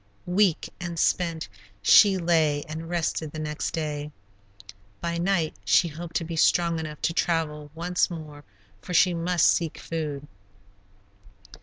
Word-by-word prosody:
Weak 180 -1 +2
and 175 -1 -5
spent 165 - 0 0.4
she 195 - +7
lay 160 -4 +2
and 160 +2 -6
rested 165 -3 -2
the 155 - -8
next 150 0 -3
day. 150 -2 -4 0.9
By 170 0 -2
night 175 -3 +1
she 170 - +3
hoped 165 +2 -9
to - - +1
be 165 0 -5
strong 170 +1 +3
enough 155 -2 -6
to 165 - +1
travel 155 -4 -1
once 175 +2 0
more, 155 -4 -9 0.4
for 180 - -5
she 180 +1 +5
must 170 0 +1
seek 165 -3 +2
food. 150 -3 -5
165 Hz, 140 wpm, -26 LUFS, 155-175 Hz, 0.9 s, she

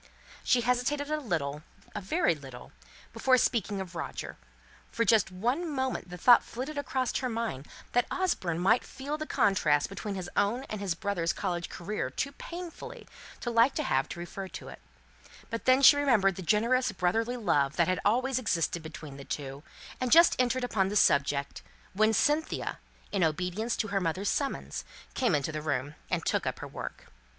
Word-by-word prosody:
She 250 - +3
hesitated 250 +5 0
a 305 - +1
little, 150 - -2 0.3
a - - -4
very 255 - +2
little, 135 -5 -11 0.4
before 260 -1 +4
speaking 215 -5 0
of 185 -2 -6
Roger; 165 - -5 0.6
for 230 - 0
just 220 -5 +4
one 245 - -1
moment 260 -8 -2
the 180 - -7
thought 240 +7 +7
flitted 265 +6 -6
across 260 -3 -1
her 255 - -2
mind, 225 - -3 0.2
that 245 0 +2
Osborne 185 - -1
might 190 +7 +3
feel 275 +2 -5
the 310 0 -5
contrast 185 - +2
between 200 +1 -5
his 185 -2 -5
own 230 +6 +1
and 215 -2 -4
his 190 -4 -1
brother's 175 -3 -1
college 175 -1 -3
career 205 +4 -3
too 280 - -3
painfully 340 +3 -8 0.3
to 240 - -2
like 230 +3 +4
to 305 - 0
have 135 - +1
it - - -7
referred 180 +2 -7
to; - - -8 0.8
but 230 - -4
then 260 +1 +5
she 285 - +10
remembered 240 -9 +3
the 190 - -6
generous 230 +7 +2
brotherly 225 +6 0
love 145 - +1
that 170 - +3
had 185 0 +1
always 255 +5 +2
existed 170 -7 0
between 155 -3 -9
the 140 - -9
two, 135 -1 -5 0.4
and 255 - 0
had - - +3
just 335 +1 +7
entered 255 0 +1
upon 195 -6 +1
the 205 - -4
subject, 140 -6 +2 0.3
when 215 +3 +3
Cynthia 295 +8 0 0.3
in 195 -3 +1
obedience 180 +8 -1
to 215 - -1
her 200 -1 0
mother's 185 +4 -1
summons, 280 -2 -2 0.3
came 245 - +2
into 145 +2 -1
the 155 0 -4
room, 145 -1 -2 0.2
and - - -1
took - - 0
up - - -2
her - - -7
work. - - -8
210 Hz, 180 wpm, -29 LUFS, 170-255 Hz, 0.8 s, she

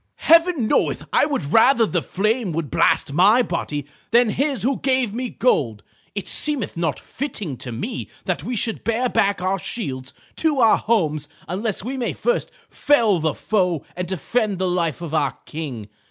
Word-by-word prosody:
"Heaven 330 -5 +4
knoweth - - +1
I - - +4
would 270 - -2
rather 235 +1 +5
the 175 -5 -1
flame 215 +1 -1
would 155 -3 -3
blast 140 - +2
my 205 - +5
body 150 - -3 0.2
than 235 0 +4
his 275 +1 0
who 265 +2 0
gave 260 -5 +1
me 250 +2 -3
gold. 130 - 0 0.3
It 200 - -4
seemeth 290 -8 +2
not 165 -5 -1
fitting 210 - -5
to 125 - -6
me 210 - -5 0.2
that 180 -7 -2
we 245 +6 -3
should 225 0 -2
bear 230 +2 0
back 200 -5 +1
our 190 +1 0
shields 135 - -5 0.2
to 310 -4 +2
our 225 -3 +5
homes 155 -10 0 0.2
unless 195 +3 -3
we 260 +4 -4
may 245 - -2
first 485 0 -1 0.2
fell 230 -10 +2
the 155 -2 -1
foe 180 -7 0
and 180 0 -4
defend 200 - -1
the 185 +1 -1
life 170 -3 -1
of 160 -2 -6
our 145 -4 0
King. 140 -9 -6
200 Hz, 175 wpm, -22 LUFS, 160-245 Hz, 0.3 s, rather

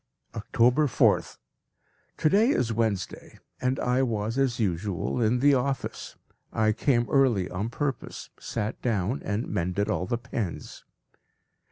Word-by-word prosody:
October 120 +6 +2
4th. 110 -6 +2 0.8
To - - +2
day 210 +9 +4
is 120 - +1
Wednesday, 110 -5 -2 0.2
and 130 0 0
I 125 +1 +1
was 115 -3 -1
as 130 -3 +1
usual 100 +3 -1
in 120 +2 +2
the 145 +1 +6
office. 135 0 -2 0.4
I 110 0 +2
came 120 +1 +1
early 125 -10 +2
on 100 +5 -2
purpose, 135 +2 -4
sat 110 -2 -4
down, 110 +1 0
and 105 +4 -2
mended 95 +1 -1
all 90 - -1
the 120 - 0
pens. 115 -6 -5
115 Hz, 135 wpm, -27 LUFS, 105-130 Hz, 0.8 s, the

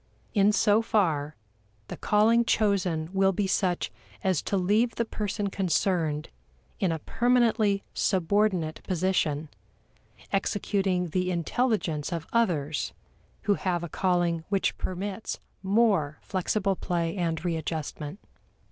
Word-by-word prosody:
In 205 -1 +5
so 210 0 +4
far, 160 -10 +1 0.5
the - - -6
calling 225 +3 +3
chosen 185 -8 +1
will 195 0 +4
be 195 +2 -1
such 180 - 0 0.3
as 185 -5 +2
to 200 - -1
leave 210 +5 +2
the 235 - 0
person 205 -2 -3
concerned 170 -5 0 0.5
in 185 - +1
a 165 - -1
permanently 225 0 +2
subordinate 185 -3 +1
position, 170 -5 0 0.9
executing 195 -2 0
the 180 +3 0
intelligence 175 - 0
of 165 -2 -3
others 160 -11 0 0.5
who 205 - +3
have 180 -3 -1
a 170 - -5
calling 175 -2 +1
which 195 -1 +1
permits 190 +3 -4 0.2
more 195 -7 +2
flexible 195 +1 0
play 170 -2 -2
and 170 -2 -2
readjustment. 160 -1 -3
185 Hz, 115 wpm, -27 LUFS, 165-205 Hz, 0.9 s, In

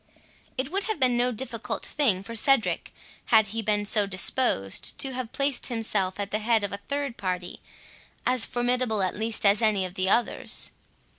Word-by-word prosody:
It 260 +3 -2
would 390 +1 -1
have 435 -7 -2
been 255 -2 +3
no 245 +1 +2
difficult 230 -1 -5
thing 220 -11 +1
for 230 +3 -8
Cedric, 270 +1 +2 0.3
had 220 -2 +5
he 225 - -1
been 210 -1 0
so 205 0 +2
disposed, 185 - +1
to 270 - -2
have 250 -2 -4
placed 275 -2 0
himself 210 -5 -1
at 200 0 -3
the 215 - 0
head 220 -1 +2
of 200 - -3
a - - -3
third 280 -3 -2
party, 180 -2 -4 0.7
as 250 -2 +3
formidable 245 -4 0
at 185 - -1
least 220 0 -2
as 200 +2 +5
any 210 -4 +2
of 180 - -7
the 190 0 0
others. 235 +4 +1
225 Hz, 180 wpm, -26 LUFS, 200-250 Hz, 0.7 s, had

